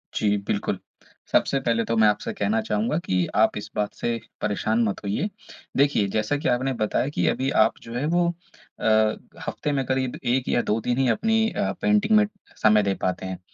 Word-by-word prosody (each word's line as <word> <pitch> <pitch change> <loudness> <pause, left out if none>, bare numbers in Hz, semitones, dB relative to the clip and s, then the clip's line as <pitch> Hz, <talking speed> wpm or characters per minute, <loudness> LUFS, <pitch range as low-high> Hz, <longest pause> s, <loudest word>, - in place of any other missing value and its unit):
जी, 105 -1 +2
बिल्कुल। - - -1 0.5
सबसे 135 - +2
पहले 115 -3 +1
तो 115 - -1
मैं 110 - +6
आपसे 105 - 0
कहना 105 +2 0
चाहूँगा 110 +7 -1
कि 90 -1 +1
आप - - +3
इस - - -6
बात 105 -1 -1
से 115 -1 -2 0.2
परेशान 110 +2 +1
मत 105 -3 -1
होइए। 105 - -1 0.5
देखिए 140 -7 +3
जैसा 110 +7 +1
कि 150 - -3
आपने 130 +2 +1
बताया 110 +4 +1
कि - - +1
अभी 135 +1 0
आप 110 - -1
जो 115 - -9
है 130 +4 -1
वो 175 +2 +2 0.5
अ, - - -4 0.6
हफ्ते 150 - -2
में 135 -2 0
करीब 130 -1 -1
1 125 +1 0
या 120 - +2
दो 110 +2 0
2 120 - 0
ही 135 - +3
अपनी 225 - +2
अ, - - -1
पेंटिंग 210 +1 +3
में 210 - +5 0.4
समय 105 -1 +5
दे 100 -1 +1
पाते 95 0 -1
हैं, 95 -1 -5
115 Hz, 200 wpm, -24 LUFS, 105-140 Hz, 0.6 s, मैं